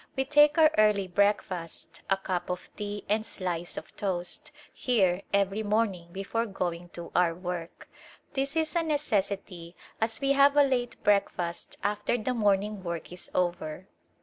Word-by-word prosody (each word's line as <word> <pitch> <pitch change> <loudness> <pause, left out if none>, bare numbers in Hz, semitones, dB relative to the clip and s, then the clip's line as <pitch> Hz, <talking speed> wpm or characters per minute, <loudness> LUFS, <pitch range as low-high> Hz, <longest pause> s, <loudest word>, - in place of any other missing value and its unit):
We 265 - 0
take 295 +2 +5
our 315 -1 +7
early 210 -2 +4
breakfast 180 -4 -1
— - - -32
a 195 - +3
cup 185 -2 -3
of 180 0 -5
tea 205 -1 -5
and 215 +2 +1
slice 175 -5 -4
of - - -8
toast 195 +10 -2
— - - -25
here 190 -7 +3
every 200 +1 +1
morning 205 -5 0
before 200 +5 -2
going 175 -3 -3
to 170 -1 -8
our 170 -2 +3
work. 175 -1 -6 0.5
This 275 +2 -1
is 320 0 0
a 340 - +3
ne 315 -2 0
cessity 195 - -2 0.3
as 225 0 0
we 275 0 +1
have 280 +1 +5
a 290 - +8
late 250 -3 0
breakfast 180 -4 0
after 210 +3 0
the 245 +3 -1
morning 205 -2 +1
work 170 -1 -5
is 180 - -10
over. 175 0 -1
200 Hz, 170 wpm, -28 LUFS, 180-235 Hz, 0.5 s, a